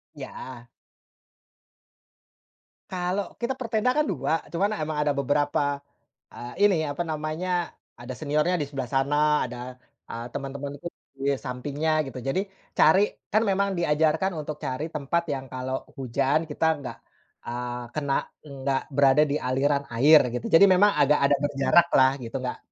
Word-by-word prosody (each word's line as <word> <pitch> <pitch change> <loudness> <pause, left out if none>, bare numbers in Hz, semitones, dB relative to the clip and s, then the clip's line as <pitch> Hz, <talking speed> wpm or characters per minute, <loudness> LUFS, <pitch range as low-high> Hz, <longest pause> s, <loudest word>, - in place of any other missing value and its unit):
Ya. 120 -2 -9 2.2
Kalau 185 +1 -2
kita 240 +3 0
per 245 - -4
tenda 225 +2 +1
kan 300 +3 +1
2, 160 - 0
cuman 195 +5 0
emang 155 0 -3
ada 150 - +1
beberapa, 145 0 0 0.5
eee, 125 +12 0
ini, 190 -5 +3
apa 155 +3 -3
namanya, 160 +3 -2 0.2
ada 120 +1 -11
seniornya 150 +4 +1
di 145 - -2
sebelah 135 -4 -5
sana, 145 +2 +2
ada, 125 +1 -8 0.3
eee, 115 +1 -5
teman-temanku 140 +1 -6 0.3
di 140 +1 -1
sampingnya, 145 +5 -1
gitu. 130 - -8
Jadi, 135 +9 -1 0.3
cari 190 +6 +5 0.2
kan 215 - +3
memang 200 0 +1
diajarkan 160 +3 +1
untuk 150 -1 -5
cari 150 +5 -4
tempat, 150 +3 -1
yang 135 -2 -3
kalau 130 +1 -5
hujan, 135 +4 0
kita 155 +2 0 0.2
nggak, 125 - -7 0.5
eee, 120 0 -4
kena, 145 -2 0 0.2
enggak 135 -2 -2
berada 140 +1 +4
di 150 -1 +1
aliran 140 +2 0
air, 145 +7 +7 0.2
gitu. 125 - -3
Jadi 180 +5 +8
memang 195 +2 +5
ada 145 0 +4
agak 140 0 +4
berjaraklah, 135 -1 +4
gitu. 120 0 -6
Nggak 125 - -4
145 Hz, 145 wpm, -26 LUFS, 135-165 Hz, 2.2 s, Jadi